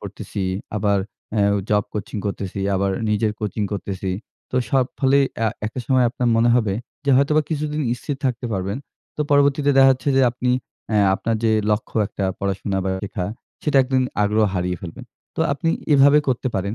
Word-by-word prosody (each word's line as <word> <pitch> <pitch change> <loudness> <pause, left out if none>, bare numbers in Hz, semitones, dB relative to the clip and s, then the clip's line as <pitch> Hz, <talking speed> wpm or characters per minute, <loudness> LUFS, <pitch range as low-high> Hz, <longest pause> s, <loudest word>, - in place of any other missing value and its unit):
পড়তেছি। 100 - -6 0.3
আবার 100 -1 +2 0.4
অ্যাও 100 -1 +3 0.2
job 105 -1 +3
coaching 105 +1 -4
করতেসি, 100 -1 -4
আবার 100 +1 +1 0.2
নিজের 105 0 +1
কোচিং 105 0 -2
করতেসি। 95 -2 -3 0.4
তো 125 - -2
সব 135 -2 +3
ফলেই 140 0 +4
অ্যা 115 0 +2 0.2
একটা 115 +4 -5
সময় 130 -2 +3
আপনার 125 0 -1
মনে 115 +1 +4
হবে 110 -5 +1 0.3
যে 140 - +2
হয়তোবা 150 +3 +3
কিছুদিন 150 0 -1
স্থির 140 +3 -5
থাকতে 125 -1 -1
পারবেন। 95 +1 -2 0.4
তো - - -4
পরবর্তীতে 145 0 +4
দেখা 135 0 +8
যাচ্ছে 130 +2 -3
যে 135 - +5
আপনি 125 +1 -1 0.4
অ্যা 105 - +2 0.2
আপনার 115 +3 -1
যে 110 - +4 0.2
লক্ষ্য 105 +2 -2
একটা 100 - -4
পড়াশোনা 100 0 -2
বা 95 - 0
শেখা, 95 -2 -3 0.4
সেটা 150 -2 +1
একদিন 130 0 +1 0.2
আগ্রহ 105 +1 +3
হারিয়ে 90 0 -1
ফেলবেন। 85 -3 -8 0.3
তো - - -2
আপনি 165 +4 0 0.2
এভাবে 145 +1 +6
করতে 130 0 0
পারেন 100 +2 -1
115 Hz, 175 wpm, -22 LUFS, 100-135 Hz, 0.4 s, দেখা